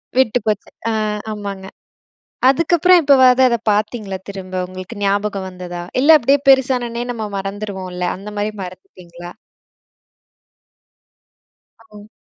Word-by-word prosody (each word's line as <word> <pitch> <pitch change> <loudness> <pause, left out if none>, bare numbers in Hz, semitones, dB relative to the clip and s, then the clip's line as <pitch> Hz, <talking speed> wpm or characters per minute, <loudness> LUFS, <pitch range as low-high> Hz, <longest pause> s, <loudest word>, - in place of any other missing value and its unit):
விட்டு 250 -2 +3
போச்சு. 210 -2 -2 0.2
அ - - 0 0.4
ஆமாங்க. 200 -2 -6 0.8
அதுக்கப்புறம் 340 +5 +4
எப்பவாது 260 -3 +5
அத 235 - +1 0.2
பார்த்தீங்களா 210 -2 -2
திரும்ப? 190 -2 -8
உங்களுக்கு 185 +4 -9
ஞாபகம் 200 -1 -1
வந்ததா? 180 -1 -7 0.2
இல்ல 310 +4 +7
அப்படியே 275 +2 +3
பெருசானனொனே, 250 -3 +2
நம்ம 220 -3 -5
மறந்துருவோம்ல? 195 -2 -5
அந்த 195 +3 -10
மாரி 205 +1 -1
மறந்துட்டீங்களா? 175 -1 -11 2.6
ஓ. 210 0 -13
210 Hz, 105 wpm, -18 LUFS, 190-250 Hz, 2.6 s, இல்ல